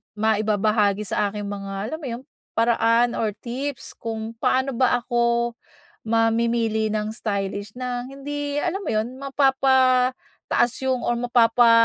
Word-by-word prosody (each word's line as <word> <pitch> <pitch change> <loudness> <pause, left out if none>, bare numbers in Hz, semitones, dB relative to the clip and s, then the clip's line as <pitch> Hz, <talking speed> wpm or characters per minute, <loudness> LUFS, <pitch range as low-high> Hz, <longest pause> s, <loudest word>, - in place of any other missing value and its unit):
maibabahagi 210 -1 +2
sa 205 -1 0
aking 205 -1 -4
mga, 195 +1 -5
alam 315 - -4
mo 290 - -6
'yong, 240 +2 -5 0.3
paraan, 230 +1 +3
or 215 -2 0
tips 260 +2 -5
kung 225 0 -5
paano 260 +3 +1
ba 245 0 +2
ako 235 -1 +1 0.5
mamimili 225 -1 +2
ng 215 0 -2
stylish 200 -1 -3
na 250 -1 -3
hindi, 285 +1 -4
alam 365 +2 -1
mo 390 - -6
'yon, 215 +1 0
mapapataas 265 -3 +2 0.2
'yong 255 -2 0
or 240 0 0
mapapa 240 -1 +4
235 Hz, 130 wpm, -23 LUFS, 215-255 Hz, 0.5 s, mapapa